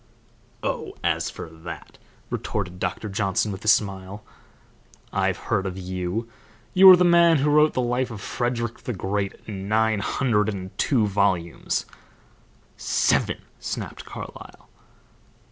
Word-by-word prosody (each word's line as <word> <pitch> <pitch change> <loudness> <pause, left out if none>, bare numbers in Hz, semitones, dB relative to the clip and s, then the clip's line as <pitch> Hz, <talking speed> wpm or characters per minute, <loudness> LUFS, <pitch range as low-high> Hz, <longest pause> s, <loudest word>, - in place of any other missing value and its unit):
"Oh, - - -3
as - - +1
for - - -8
that," 80 +1 -10 0.3
retorted 90 -4 -3
Doctor 90 +4 -3
Johnson, 100 0 0
with 95 - -7
a - - -6
smile, 100 -1 +1 0.9
"I've - - +1
heard 95 -2 -1
of 95 0 -5
you; 95 +4 -3 0.5
you 190 +1 +9
are 185 - +12
the 180 - +3
man 170 -2 +6
who 145 +2 +2
wrote 150 +1 +5
the 125 - +1
life 125 +1 0
of 110 -3 -7
Frederick 120 +1 -2
the 125 - -4
Great 100 +1 -2
in 100 -2 -6
nine 110 0 +2
hundred 105 -1 +1
and 95 -2 -6
two 120 -7 +3
volumes 95 -4 0 0.5
" - - -34 0.2
"Seven!" - - +2 0.2
snapped - - -5
Carlyle. - - -10
105 Hz, 140 wpm, -24 LUFS, 95-120 Hz, 0.9 s, are